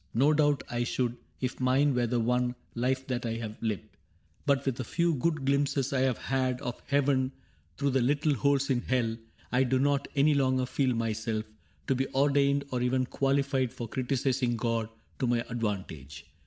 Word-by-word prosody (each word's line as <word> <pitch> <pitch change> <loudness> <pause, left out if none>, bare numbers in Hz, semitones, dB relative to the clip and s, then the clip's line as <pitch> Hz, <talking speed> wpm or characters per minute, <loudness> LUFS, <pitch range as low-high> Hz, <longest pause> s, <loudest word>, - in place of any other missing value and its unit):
No 140 +6 +4
doubt 145 -1 +2
I 120 0 -1
should, 120 0 -1 0.3
If 130 -1 -2
mine 135 +3 +3
were 125 -1 +1
the 120 +1 0
one 125 +1 +1 0.2
life 130 +2 0
that 125 -1 -2
I 115 -1 -2
have 110 -2 -6
lived; 110 -2 -4 0.5
But 140 -1 +2
with 130 -2 -1
a - - -1
few 170 +7 +1
good 155 0 0
glimpses 140 -1 +1
I 135 - +2
have 130 -2 +2
had 130 -1 -1
Of 125 -4 -5
heaven 135 -2 +2 0.4
through 140 +4 +1
the 130 0 +2
little 145 +4 +2
holes 140 +2 +2
in 125 -2 +1
hell, 120 -3 0 0.4
I 125 - +3
do 130 0 +1
not 140 +1 +1
any 145 +2 +4
longer 130 -2 +2
feel 130 -1 0
myself 110 -1 -2 0.4
To - - +2
be 135 +1 0
ordained 140 0 +3
or 125 -1 -1
even 130 +1 +1
qualified 135 -1 +1
For 120 - -6
criticising 125 -1 0
God 115 -1 -1 0.3
to 130 - +1
my 120 -1 +2
advantage. 95 - -4
130 Hz, 180 wpm, -29 LUFS, 120-140 Hz, 0.5 s, No